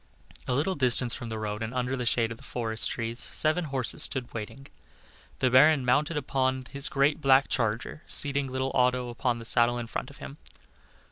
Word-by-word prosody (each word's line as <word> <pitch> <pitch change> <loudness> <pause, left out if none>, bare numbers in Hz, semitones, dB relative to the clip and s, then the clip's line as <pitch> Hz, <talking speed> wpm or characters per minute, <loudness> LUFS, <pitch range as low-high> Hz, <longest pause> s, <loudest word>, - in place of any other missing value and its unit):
A 125 - 0
little 155 +8 0
distance 125 -4 +1
from 120 - -6
the 110 - -4
road 105 0 -4
and 115 +3 -4
under 125 +1 -1
the 125 -2 -3
shade 115 0 +1
of 115 - -8
the - - -15
forest 115 -4 -2
trees, 115 0 -3
seven 160 +3 +1
horses 135 -5 0
stood 130 -3 +1
waiting. 115 +4 -7 0.7
The 130 -1 +1
Baron 135 +1 +5
mounted 150 +6 +1
upon 130 -2 -1
his 140 0 -2
great 140 +2 +1
black 135 0 +4
charger, 115 +5 -2
seating 140 -1 0
little 130 +1 -2
Otto 125 -1 +1
upon 120 0 -1
the 115 - -9
saddle 120 +1 +2
in 120 - -4
front - - -5
of - - -14
him. 70 +1 -9
125 Hz, 195 wpm, -27 LUFS, 115-135 Hz, 0.7 s, Baron